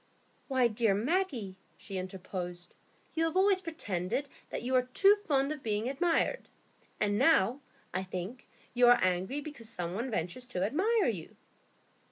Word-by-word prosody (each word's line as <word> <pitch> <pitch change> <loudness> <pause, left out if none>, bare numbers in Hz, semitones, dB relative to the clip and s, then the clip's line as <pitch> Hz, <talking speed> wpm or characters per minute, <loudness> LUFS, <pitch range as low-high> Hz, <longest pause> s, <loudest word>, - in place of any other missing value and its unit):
"Why, 260 -3 +3
dear 220 -2 +2
Maggie," 240 - -1 0.2
she 195 -3 -5
interposed, 180 -1 -6 0.4
"you 325 - +1
have 325 +2 -1
always 380 0 +4
pretended 270 - -3 0.2
that - - -4
you 255 +2 -2
are 255 - +6
too 400 +1 +7
fond 280 -6 +1
of 305 -2 -5
being 215 0 -1
admired; 330 - 0 0.5
and 205 0 +1
now, 265 -3 +4 0.3
I 185 - 0
think, 190 +6 -6 0.3
you 245 0 +5
are 245 - +8
angry 185 +10 0
because 280 -7 -8
some 175 -6 -3
one 235 +7 -2
ventures 215 +4 -3
to 185 -7 -2
admire 395 - +2
you." 185 -9 -3
240 Hz, 155 wpm, -31 LUFS, 190-295 Hz, 0.5 s, are